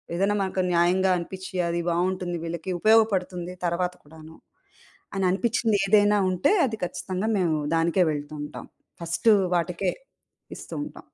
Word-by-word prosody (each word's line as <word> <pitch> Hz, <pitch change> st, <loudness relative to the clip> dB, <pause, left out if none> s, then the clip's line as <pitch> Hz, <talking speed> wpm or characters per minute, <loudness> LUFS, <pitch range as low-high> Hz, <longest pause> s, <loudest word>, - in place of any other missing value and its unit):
ఏదైనా 200 Hz, +3 st, +1 dB
మనకు 190 Hz, 0 st, -1 dB
న్యాయంగా 180 Hz, +2 st, +3 dB
అనిపిచ్చి 190 Hz, +2 st, -8 dB
అది 170 Hz, 0 st, -1 dB
బావుంటుంది 175 Hz, 0 st, -1 dB
వీళ్ళకి, 170 Hz, +2 st, -4 dB
ఉపయోగపడుతుంది 190 Hz, -5 st, +2 dB
తర్వాత 180 Hz, +1 st, 0 dB
కూడాను, 160 Hz, +1 st, -14 dB, 0.8 s
అని 195 Hz, -, 0 dB
అనిపిచ్చిందేదైనా 205 Hz, -1 st, +2 dB
ఉంటే, 185 Hz, -, +2 dB
అది 220 Hz, -2 st, -5 dB
ఖచ్చితంగా 185 Hz, +4 st, -3 dB
మేము 165 Hz, -4 st, +1 dB, 0.2 s
దానికే 170 Hz, +3 st, +2 dB
వెళ్తూంటాం. 145 Hz, 0 st, -7 dB, 0.3 s
ఫస్ట్ 170 Hz, +6 st, -3 dB, 0.3 s
వాటికే 175 Hz, +2 st, -1 dB, 0.7 s
ఇస్తూ -, -, -10 dB
ఉంటాం. -, -, -11 dB
180 Hz, 120 wpm, -25 LUFS, 170-195 Hz, 0.8 s, న్యాయంగా